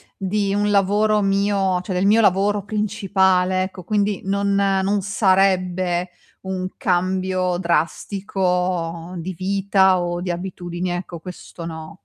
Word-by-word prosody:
di 195 0 -1
un 205 0 +1
lavoro 210 +2 +3
mio, 195 -2 +1
cioè 185 0 -5
del 185 +2 +1
mio 220 +3 +5
lavoro 200 +1 +2
principale, 190 -3 +1
ecco, 185 -1 -7
quindi 205 0 0
non 200 0 0
non 195 0 +1
sarebbe 185 -2 +1 0.3
un 185 -1 -4
cambio 185 0 0
drastico 180 0 -1
di 180 +3 -5
vita 190 0 +2
o 175 0 -2
di 180 - -4
abitudini, 175 0 -4
ecco, 175 -1 -5
questo 175 -1 -9
no. 160 0 -8
190 Hz, 125 wpm, -21 LUFS, 180-200 Hz, 0.3 s, mio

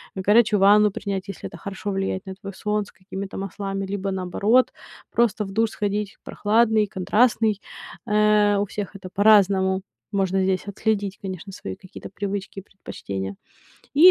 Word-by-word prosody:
горячую 210 +2 +4
ванну 205 +1 +6
принять, 195 -1 -4
если - - -6
это 170 - -11
хорошо 200 +2 -5
влияет 195 0 -2
на 190 - -6
твой 200 0 -8
сон, 210 +2 -1
с - - -16
какими-то 190 +1 -7
маслами, 195 0 -4
либо 195 0 -2
наоборот 200 +7 +2 0.4
просто 225 -2 +2
в 195 - -8
душ 220 +2 +1
сходить, 205 0 -2
прохладный, 220 0 +2
контрастный. 215 +2 +2 0.4
Э, 210 -1 +4
у 205 - +1
всех 205 0 -6
это 185 -1 -8
по-разному. 195 -2 +4 0.3
Можно 190 -1 +1
здесь 190 +1 0
отследить, 200 -1 -1
конечно, 190 0 -6
свои 95 - -7
какие-то 185 - -11
привычки 200 0 -4
и - - -8
предпочтения. 100 - -6 0.6
И 345 +6 +9
200 Hz, 155 wpm, -23 LUFS, 190-210 Hz, 0.6 s, И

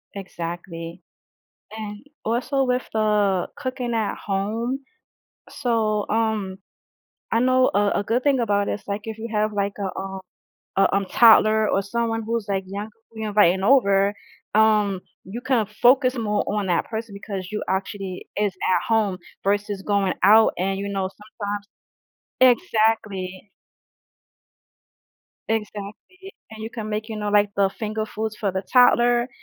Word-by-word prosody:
Exactly. 170 -2 -7 0.8
And 210 -1 -6 0.2
also 250 +4 0
with 250 -1 0
the 210 -4 +2
cooking 255 -3 -3
at 220 -2 -1
home, 220 +6 -1 0.7
so, 220 -5 0
um, 215 -4 -1 0.7
I 230 - +3
know 255 +1 +4
a 205 0 +3
a - - -4
good 235 +5 0
thing 280 -1 +3
about 205 -4 +1
it - - 0
is, - - -27
like, 205 +1 -3
if 220 -1 -6
you 230 +1 -5
have 215 0 +1
like 200 -1 -1
a, 195 -2 -2
um 190 0 -5 0.6
a, 195 - +5
um, 200 0 +1
toddler 220 0 +6
or 195 - +2
someone 225 +2 -2
who's 230 -2 -2
like 195 -1 -1
younger 200 +3 -6 0.2
you're 220 -1 -4
inviting 190 -3 +4
over, 200 -4 +4 0.4
um, 210 -3 +3 0.2
you 210 +6 -7
can 245 -3 +1
focus 250 +5 +3
more 210 -2 0
on 205 -1 -1
that 175 -2 +1
person 220 -2 -5
because 200 -2 -6
you 210 - -2
actually 190 0 -3
is 205 -1 +1 0.2
at 185 - +2
home 215 -4 +2 0.3
versus 205 0 0
going 200 -2 +1
out 220 +3 +7
and 195 +2 -1
you 200 - -3
know, 195 -1 -2 0.3
sometimes 205 0 -3 0.8
exactly. 215 -6 +2 2.0
Exactly, 220 - -5 0.2
and 220 0 -9
you 220 - -5
can 220 -3 -6
make, 215 +1 -3
you 220 - -5
know, 210 -1 -2
like 205 0 +4
the 200 -1 +3
finger 215 +2 -4
foods 220 0 -4
for 210 -3 -1
the 190 +1 -2
toddler, 240 +1 +4
210 Hz, 150 wpm, -23 LUFS, 195-225 Hz, 2.0 s, out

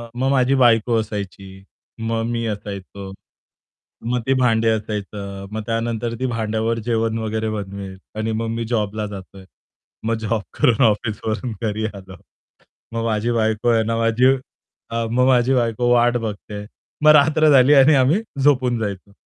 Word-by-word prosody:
मग 130 +2 0
माझी 135 0 +3
बायको 115 -1 +4
असायची, 95 -2 -7 0.4
मग 115 0 -2
मी 115 -1 -2
असायचो. 100 -1 -8 0.9
मग 125 +1 0
ते 135 - +4
भांडे 115 -2 +3
असायचं. 105 -2 -4
मग 110 +1 -4
त्यानंतर 115 0 -2
ती 130 - -1
भांड्यावर 115 -1 -1
जेवण 115 -1 0
वगैरे 110 0 -2
बनवेल 100 -2 -6 0.2
आणि 110 +1 -1
मग 115 +1 -2
मी 115 0 -3
जॉबला 110 -2 -1
जातोय. 95 -1 -10 0.6
मग 115 +1 +1
जॉब 110 0 -1 0.2
करून 120 +1 +3
ऑफिसवरून 110 +2 -1
घरी 110 -1 -2
आलो. 95 -1 -11 0.8
मग 115 0 -2
माझी 115 +1 0
बायको 110 0 +1
आहे 115 -1 +3
ना, 115 +1 -1
माझी 115 +2 +2 0.7
अ, 115 0 -1
मग 125 +2 +3
माझी 125 0 +3
बायको 120 -1 +1
वाट 120 0 +3
बघते 110 -2 -6
आहे. 105 0 -7 0.4
मग 155 - +8
रात्र 155 +1 +4
झाली 135 +1 +6
आणि 145 +2 +6
आम्ही 140 +10 +3 0.2
झोपून 130 -4 +3
जायचो. 100 -2 -5
115 Hz, 155 wpm, -21 LUFS, 105-120 Hz, 0.9 s, मग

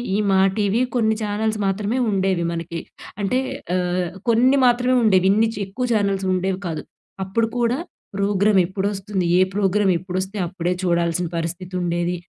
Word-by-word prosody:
ఈ - - +2
'మా 190 - +4 0.2
టీవీ' 210 +4 +2
కొన్ని 220 -2 +2
ఛానల్స్ 215 +1 -1
మాత్రమే 205 +5 -1
ఉండేవి 190 -3 +1
మనకి. 165 0 -4 0.4
అంటే 250 +6 +1 0.4
ఆహ్, 180 -1 0 0.2
కొన్ని 255 +4 +4
మాత్రమే 250 +1 +3
ఉండేవి 190 -3 +4
ఇన్ని 220 +2 +3
చి - - -6
ఎక్కువ 245 +6 -3
ఛానల్స్ 200 -2 0
ఉండేవి 185 +1 -1
కాదు. 160 -2 -4 0.4
అప్పుడు 225 +4 0
కూడా 240 +2 +1 0.4
ప్రోగ్రామెప్పుడొస్తుంది? 195 -1 +1
ఏ - - +5
ప్రోగ్రామ్ 200 -1 +2
ఎప్పుడొస్తే 185 +3 -4
అప్పుడే 175 0 -2
చూడాల్సిన 170 0 +1
పరిస్థితుండేది. 175 0 -2
195 Hz, 135 wpm, -21 LUFS, 180-215 Hz, 0.4 s, ఏ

